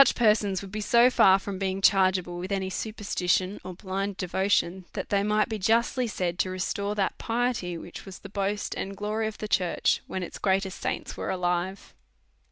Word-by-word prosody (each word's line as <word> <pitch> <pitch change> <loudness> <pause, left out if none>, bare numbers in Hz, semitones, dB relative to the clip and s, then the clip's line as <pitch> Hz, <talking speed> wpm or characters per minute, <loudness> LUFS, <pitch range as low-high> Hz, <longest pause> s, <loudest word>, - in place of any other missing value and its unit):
9lf 275 - +5
persons 210 -4 +3
would 195 - -9
be 215 +1 -3
so 235 +4 +5
far 190 -5 +6
from 195 -1 -6
being 190 -1 -1
chargeable 185 -3 +3
with 185 +3 -5
any 190 -1 -1
superstition 195 -2 -1
or 185 - -7
blind 195 +1 -3
devotion^ 190 0 +1
that - - -4
they 200 -1 +2
might 210 +1 +2
be 220 -1 -4
justly 235 +5 +2
said 180 -4 -2
to 185 - +1
restore 200 +2 -2
that 195 -2 0
piety 230 -7 -1
which 170 - -9
was 195 -2 -9
the - - -10
boast 200 +1 -2
and 195 0 -5
glory 215 +2 -1
of 220 - -6
the 215 - -5
church 180 -4 +1
when 185 - -3
its - - -7
greatest 190 -1 0
saints - - -3
were - - -4
alive. 180 +1 -2
195 Hz, 190 wpm, -27 LUFS, 185-210 Hz, -, far